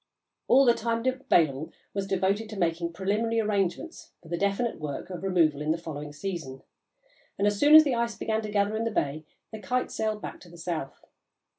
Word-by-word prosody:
All 270 +2 +6
the 240 - +6
time 230 0 -2
available 170 - +1 0.2
was 195 -1 -2
devoted 195 +3 0
to 215 - -7
making 170 -1 0
the 170 - -11
preliminary 210 +5 0
arrangements 210 - -2
for 165 - -14
the 170 - -1
definite 200 +4 0
work 150 +4 -5
of 180 - -6
removal 165 -6 +2
in 150 - -2
the 160 - +2
following 150 -3 -7
season, 145 -4 -6 0.7
and, 200 - +1
as 205 -1 +1
soon 295 +1 +7
as 315 - +11
the 280 -4 0
ice 235 -1 -1
began 220 0 -1
to 215 - -5
gather 205 +1 +1
in 220 - -1
the 230 - 0
bay, 155 -7 -2 0.3
the 220 - -7
Kite 250 +6 -1
sailed 215 -1 -2
back - - -7
to 175 - -15
the 170 - -14
south. 165 -5 -5
195 Hz, 205 wpm, -27 LUFS, 165-225 Hz, 0.7 s, as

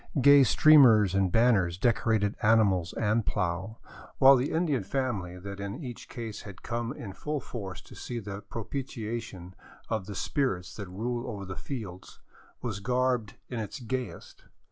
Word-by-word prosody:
Gay 140 +2 +8
streamers 125 - +6
and 95 -2 +2
ban 120 +5 +5
ners 90 -4 0
decorated 110 -2 +1
animals 100 -6 +3
and 110 +1 +1
plow, 95 +2 -2 0.4
while 135 0 +8
the 130 +2 0
Indian 160 -5 +1
family 100 -7 -2
that 100 +2 -8
in 100 +9 -5
each 120 -3 -8
case 115 -4 -6
had 100 -3 -11
come 115 0 -3
in 105 -7 -7
full 150 +8 -3
force 100 -8 -7
to - - -16
see 120 - -6
the 100 -3 -6
propitiation 110 -5 -6 0.4
of 110 -4 -2
the 100 - -6
spirits 95 - -1
that 100 -4 -7
rule 120 +6 -3
over 100 -4 -6
the 95 0 -6
fields, 100 -9 -7 0.4
was 110 -5 -3
garbed 125 -1 0
in 120 - -4
its 110 +5 -5
gayest. 125 -1 -6
110 Hz, 160 wpm, -29 LUFS, 100-125 Hz, 0.4 s, Gay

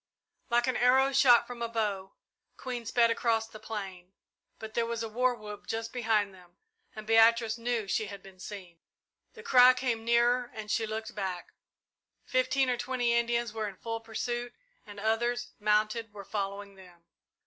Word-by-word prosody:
Like 240 0 +3
an 255 -1 0
arrow 265 +2 +4
shot 255 -3 +6
from 245 -1 -9
a 235 - -2
bow, 205 -4 -2 0.4
Queen 245 -3 -5
sped 230 0 +3
across 225 -1 0
the 215 -1 -12
plain, 190 -5 -7 0.4
but 220 0 -9
there 230 0 0
was 230 -1 -3
a - - -3
war 250 +3 +1
whoop 210 -2 -10
just 225 0 -4
behind 220 -5 +1
them 180 -2 -19 0.4
and 215 0 -8
Beatrice 225 0 +4
knew 230 -3 -1
she 215 +2 -1
had 200 -1 -9
been 190 -1 -15
seen. 185 -4 -9 0.5
The 455 - -12
cry 255 - +7
came 240 -3 -2
nearer 240 +1 +2
and 215 -1 -6
she 225 -1 0
looked 220 +1 -5
back. 190 -4 -5 0.7
Fifteen 255 +1 +1
or 250 -1 0
twenty 245 -1 0
Indians 235 -1 0
were 220 -1 -3
in 200 - -8
full 225 0 -4
pursuit 240 +2 -4 0.3
and 205 -1 -10
others, 240 +3 -1
mounted, 215 +1 +1
were 200 -1 -10
following 200 0 -4
them. 180 -3 -17
225 Hz, 170 wpm, -30 LUFS, 210-240 Hz, 0.7 s, cry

